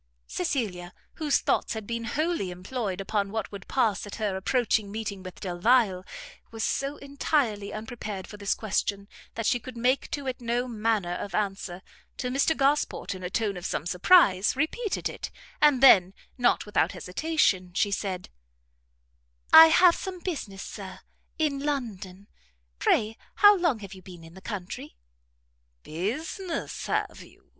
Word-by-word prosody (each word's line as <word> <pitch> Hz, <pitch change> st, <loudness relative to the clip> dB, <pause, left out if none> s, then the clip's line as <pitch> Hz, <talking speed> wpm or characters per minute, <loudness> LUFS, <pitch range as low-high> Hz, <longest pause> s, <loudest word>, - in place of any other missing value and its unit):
Cecilia, 180 Hz, -, -3 dB, 0.2 s
whose 300 Hz, -3 st, +1 dB
thoughts -, -, 0 dB
had 220 Hz, -1 st, -5 dB
been 230 Hz, +1 st, -4 dB
wholly 305 Hz, -, -1 dB
employed 190 Hz, +2 st, -4 dB
upon 200 Hz, 0 st, -1 dB
what 220 Hz, -1 st, -3 dB
would 200 Hz, -2 st, -9 dB
pass 215 Hz, -6 st, 0 dB
at 205 Hz, -, -7 dB
her 210 Hz, -3 st, -2 dB
approaching 215 Hz, 0 st, 0 dB
meeting 210 Hz, -2 st, -4 dB
with 185 Hz, -1 st, -10 dB
Delvile, 190 Hz, +1 st, +2 dB, 0.5 s
was 225 Hz, -1 st, -5 dB
so 275 Hz, +2 st, -1 dB
entirely 275 Hz, -7 st, -1 dB
unprepared 215 Hz, -3 st, -6 dB
for -, -, -11 dB
this 200 Hz, -1 st, 0 dB
question, 200 Hz, -1 st, -2 dB, 0.3 s
that 230 Hz, -, -3 dB
she 245 Hz, -, +2 dB
could 245 Hz, +1 st, -10 dB
make 250 Hz, +3 st, +1 dB
to 285 Hz, -3 st, -4 dB
it 255 Hz, -1 st, -4 dB
no 240 Hz, +1 st, -1 dB
manner 215 Hz, -6 st, 0 dB
of 200 Hz, +2 st, -5 dB
answer, 195 Hz, -3 st, -3 dB, 0.3 s
till 250 Hz, -1 st, -3 dB
Mr 280 Hz, +4 st, +2 dB
Gosport, 280 Hz, -5 st, +1 dB
in 185 Hz, -, -9 dB
a 180 Hz, -, -4 dB
tone 205 Hz, +1 st, -1 dB
of 180 Hz, -, -8 dB
some 150 Hz, -, -3 dB
surprise, 190 Hz, -, +4 dB
repeated 370 Hz, -, -1 dB
it, -, -, -6 dB, 0.3 s
and 285 Hz, -3 st, +5 dB
then, 190 Hz, -7 st, +7 dB, 0.2 s
not 245 Hz, -1 st, +2 dB
without 210 Hz, -1 st, +1 dB
hesitation, 185 Hz, -, 0 dB
she 205 Hz, -, +2 dB
said, 190 Hz, -2 st, -3 dB, 1.2 s
"I 320 Hz, 0 st, +12 dB
have 345 Hz, +2 st, +6 dB
some 375 Hz, -2 st, -6 dB
business, 250 Hz, -, -5 dB
Sir, 195 Hz, -3 st, -8 dB, 0.4 s
in 300 Hz, -4 st, 0 dB
London, 210 Hz, -9 st, -4 dB, 0.5 s
pray 220 Hz, +1 st, +2 dB, 0.2 s
how 410 Hz, 0 st, +8 dB
long 340 Hz, -, +1 dB
have 200 Hz, -1 st, -8 dB
you 190 Hz, -, -12 dB
been 175 Hz, -2 st, -12 dB
in 165 Hz, 0 st, -13 dB
the 190 Hz, -, -13 dB
country?" 190 Hz, -, -6 dB, 0.9 s
"Business, 310 Hz, -, -4 dB
have -, -, -2 dB
you?" -, -, -18 dB
220 Hz, 155 wpm, -27 LUFS, 190-270 Hz, 1.2 s, I